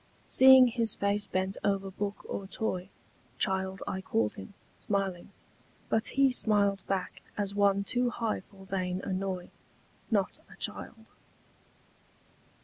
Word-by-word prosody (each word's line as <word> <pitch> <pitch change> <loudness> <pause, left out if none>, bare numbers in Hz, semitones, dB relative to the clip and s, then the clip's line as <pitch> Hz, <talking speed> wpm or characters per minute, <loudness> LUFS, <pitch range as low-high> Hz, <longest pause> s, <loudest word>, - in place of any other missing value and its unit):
Seeing 260 -1 +8
his 230 -3 +1
face 200 +1 +1
bent 190 +1 -2
over 195 -1 0
book 200 +1 -4
or 195 - -5
toy, 190 -3 -3 0.5
Child 190 -1 -1
I 190 - -3
called 110 - 0
him, 95 - -10 0.2
smiling: 195 -3 -2 0.6
but 220 0 +1
he 275 -1 +5
smiled 205 -5 +2
Back, 190 -2 -3 0.2
as 200 -1 -1
one 200 -1 +3
too 245 +4 +1
high 230 -2 -2
for 195 0 -16
vain 185 -1 -2
annoy— 185 -1 -3 0.6
Not 200 -5 0
a - - -12
child. 225 -1 -6
200 Hz, 130 wpm, -30 LUFS, 190-220 Hz, 0.6 s, Seeing